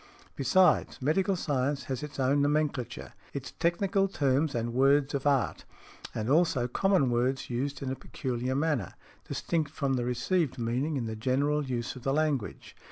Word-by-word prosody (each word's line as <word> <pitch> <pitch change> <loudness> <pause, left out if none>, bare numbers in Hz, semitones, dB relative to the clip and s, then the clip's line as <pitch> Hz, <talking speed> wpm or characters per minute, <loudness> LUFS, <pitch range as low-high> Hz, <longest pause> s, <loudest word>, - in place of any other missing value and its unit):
Besides, 155 +6 +3
medical 185 +8 +1
science 140 -4 -1
has 130 -2 -4
its 145 -2 -7
own 135 +2 +3
nomenclature, 145 -4 -1 0.2
its 140 -2 -5
technical 195 +4 +2
terms 140 -4 +1
and 120 0 -2
words 135 +2 +3
of 140 0 -1
art, 140 -3 +1 0.5
and 110 0 -2
also 140 -4 +3
common 180 -1 +2
words 125 +2 0
used 140 +3 -2
in 130 - -2
a - - -2
peculiar 130 0 -3
manner, 145 - 0 0.3
distinct 160 -4 -1
from 140 -2 -1
the 125 -2 0
received 135 +5 0
meaning 125 +6 -1
in 120 - -2
the 110 0 -4
general 140 +6 +1
use 125 -3 -3
of 130 - -9
the 135 +2 0
language. 150 -7 -1
140 Hz, 165 wpm, -29 LUFS, 125-150 Hz, 0.5 s, Besides